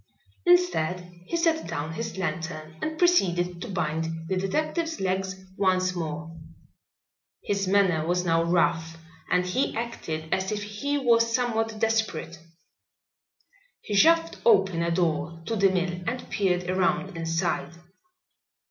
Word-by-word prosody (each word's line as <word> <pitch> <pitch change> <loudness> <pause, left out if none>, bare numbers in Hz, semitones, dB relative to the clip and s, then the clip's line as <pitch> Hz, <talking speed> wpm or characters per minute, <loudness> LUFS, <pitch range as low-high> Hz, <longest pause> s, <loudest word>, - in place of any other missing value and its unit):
Instead, 175 0 +2
he 335 - -1
set 330 -1 +1
down 150 +3 -4
his 160 - -5
lantern 160 -4 -4
and 315 0 -3
proceeded 180 - +2
to - - -5
bind 160 -2 -2
the 190 - 0
detective's 310 - -1
legs 190 0 -1 0.2
once 185 -1 +2
more. 165 -1 -5 1.1
His 200 -1 -1
manner 185 -5 +3
was 180 +1 +1
now 165 -1 +3
rough 165 -1 +1 0.3
and 180 0 +2
he 180 +9 0
acted 160 -9 -4
as 190 +1 0
if 205 -1 -2
he 210 +8 -2
was 230 -4 +3
somewhat 225 -3 0
desperate. 220 -7 -1 1.4
He 210 - -5
shoved 330 +10 +4
open 190 - +4
a 170 - +1
door 165 -1 0
to 230 - -2
the 195 -2 +4
mill 180 -1 -1
and 250 +3 -3
peered 180 -3 0
around 185 0 0
inside. 165 +1 -1
185 Hz, 130 wpm, -26 LUFS, 165-220 Hz, 1.4 s, shoved